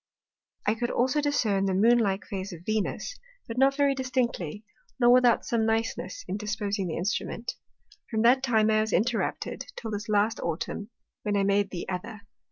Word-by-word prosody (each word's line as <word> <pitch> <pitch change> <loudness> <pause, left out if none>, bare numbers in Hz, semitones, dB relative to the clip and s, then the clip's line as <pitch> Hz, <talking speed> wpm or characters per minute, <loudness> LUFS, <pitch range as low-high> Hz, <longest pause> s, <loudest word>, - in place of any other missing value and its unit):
I 210 - +3
could 240 +2 -2
also 260 +5 +1
discern 220 -9 +1
the 190 -1 +1
Moon 235 +5 +5
like 195 -3 0
Phase 195 -1 -5
of 170 0 -11
Venus, 215 - -2 0.3
but 230 +2 -4
not 270 +1 +5
very 285 -1 +3
distinctly, 245 - -2 0.4
nor 240 -1 +6
without 245 -2 +5
some 230 -2 +1
niceness 225 - -1
in 195 - -2
disposing 205 -2 -2
the 160 - -3
Instrument. 215 +5 -2 0.6
From 220 -2 0
that 250 +3 +5
time 220 -4 +3
I 215 0 +4
was 220 -1 -2
interrupted, 230 +5 -1
till 225 - -6
this 210 +1 -4
last 210 +2 +2
Autumn, 170 +5 -3 0.3
when 205 -2 0
I 200 - +2
made 200 0 +2
the 175 -3 -5
other. 205 +4 -5
220 Hz, 175 wpm, -27 LUFS, 200-240 Hz, 0.6 s, nor